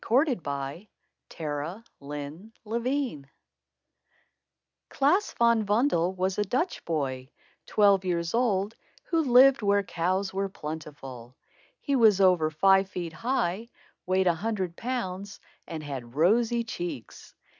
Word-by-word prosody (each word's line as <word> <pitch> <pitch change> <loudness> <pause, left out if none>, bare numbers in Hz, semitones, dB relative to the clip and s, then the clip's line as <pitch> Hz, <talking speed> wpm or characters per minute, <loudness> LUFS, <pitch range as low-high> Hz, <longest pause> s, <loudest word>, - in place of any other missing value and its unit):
THE - - -11 0.3
BOY 140 +6 -5 0.5
WHO 155 +6 -4 0.2
WANTED 145 +8 -8
MORE 225 +3 -2
CHEESE 255 - -2 1.6
Klaas 340 +10 +2
Van 235 -2 +4
Bommel 205 - +1
was 185 +2 -1
a - - +3
Dutch 255 - -2
boy, 135 -5 -2 0.4
twelve 200 -2 +4
years 170 -2 -1
old, 220 -3 +1 0.3
who 330 -2 +1
lived 260 -2 +6
where 200 -1 +2
cows 185 +2 -1
were 195 +1 -1
plentiful. 145 -7 -8 0.4
He 280 - -1
was 220 -6 +5
over 180 -5 +4
five 190 +4 +3
feet 175 -3 -5
high, 225 +1 -1 0.4
weighed 185 +1 +2
a 175 - +4
hundred 190 -1 -3
pounds, 200 -5 -4 0.3
and 160 -2 -6
had 130 -4 -7
rosy 230 +9 +3
cheeks. 175 - -7
190 Hz, 125 wpm, -27 LUFS, 160-225 Hz, 1.6 s, lived